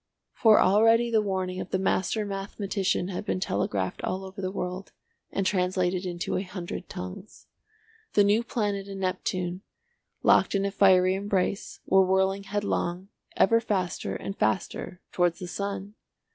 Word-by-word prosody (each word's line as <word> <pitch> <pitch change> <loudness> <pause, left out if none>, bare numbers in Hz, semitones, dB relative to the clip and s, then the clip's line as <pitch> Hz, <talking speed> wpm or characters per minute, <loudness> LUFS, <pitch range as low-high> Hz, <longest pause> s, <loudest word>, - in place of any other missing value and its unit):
For 220 -3 +5
already 225 +4 +4
the 220 -1 +4
warning 185 -2 -2
of - - -7
the - - 0
master 190 +3 0
mathematician 195 -1 -2
had 185 - -4
been 200 - -1
telegraphed 100 - -2
all 190 +1 -2
over 190 +1 -8
the 185 - -1
world, 185 0 -5 0.4
and 195 - -1
translated 185 -1 0
into 175 0 -2
a - - 0
hundred 180 -2 -6
tongues. 90 - -8 0.7
The 205 - +5
new 210 +3 +3
planet 205 -4 -2
and 195 -1 -7
Neptune, 185 -1 -2 0.6
locked - - +4
in 195 0 +1
a 200 - -1
fiery 185 -2 +5
embrace, 195 0 -2
were 190 0 +5
whirling 190 +1 +1
headlong, 195 -2 -2 0.3
ever 230 +4 +5
faster 190 -5 -2
and 195 - -5
faster 180 -1 -2
towards 175 -2 +1
the 180 - -6
sun. 200 +2 -4
190 Hz, 150 wpm, -27 LUFS, 185-200 Hz, 0.7 s, For